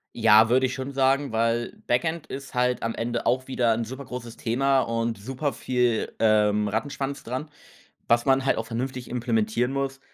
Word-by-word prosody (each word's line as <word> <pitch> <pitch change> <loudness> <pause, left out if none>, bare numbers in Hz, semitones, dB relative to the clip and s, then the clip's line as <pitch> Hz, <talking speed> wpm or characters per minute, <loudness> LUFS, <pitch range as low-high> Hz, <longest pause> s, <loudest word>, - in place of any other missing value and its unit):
Ja, 110 +1 +6
würde 130 +3 +3
ich 130 - -5
schon 135 +1 -5
sagen, 135 0 +2
weil 115 +1 0
Backend 160 +6 0
ist 135 0 -8
halt 125 0 +1
am 115 0 -1
Ende 120 0 -3
auch 130 +1 +1
wieder 120 -3 +2
'n 115 +1 -1
super 130 +5 -7
großes 120 -2 -8
Thema 135 +3 +2
und 115 -1 -2
super 135 +7 -3
viel, 125 -3 0
ähm, 105 -1 +3
Rattenschwanz 135 +6 -3
dran, 130 +6 -5 0.6
was 120 0 +3
man 135 0 +2
halt - - +3
auch 115 - -2
vernünftig 125 +2 -4
implementieren 120 0 0
muss, 135 0 -3
125 Hz, 180 wpm, -25 LUFS, 115-135 Hz, 0.6 s, Ja